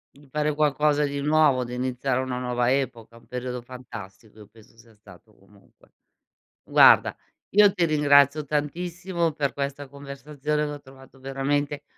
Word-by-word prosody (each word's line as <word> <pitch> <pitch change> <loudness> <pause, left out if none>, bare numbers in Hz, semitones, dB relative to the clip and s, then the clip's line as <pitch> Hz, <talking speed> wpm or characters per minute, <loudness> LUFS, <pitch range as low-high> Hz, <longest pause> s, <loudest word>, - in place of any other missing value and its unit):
Di 145 0 -19
fare 150 +2 -1
qualcosa 150 0 +2
di 140 0 -4
nuovo, 150 -3 +3
di 125 0 -8
iniziare 125 +1 -2
una 130 -1 -3
nuova 125 -1 -1
epoca, 120 -4 -2
un 115 - -18
periodo 125 0 -5
fantastico 110 -4 -11
io 105 - -13
penso 110 0 -21
sia 115 0 -20
stato 105 0 -18
comunque. 100 0 -25 0.7
Guarda - - +5 0.3
io 205 -1 +5
ti 175 -4 +1
ringrazio 145 -1 +4
tantissimo 170 +4 -2
per 145 -2 -2
questa 140 0 -4
conversazione 145 +2 -4
che - - -4
ho 145 - -7
trovato 135 -1 -17
veramente 140 +2 -2
140 Hz, 150 wpm, -25 LUFS, 125-150 Hz, 0.7 s, Guarda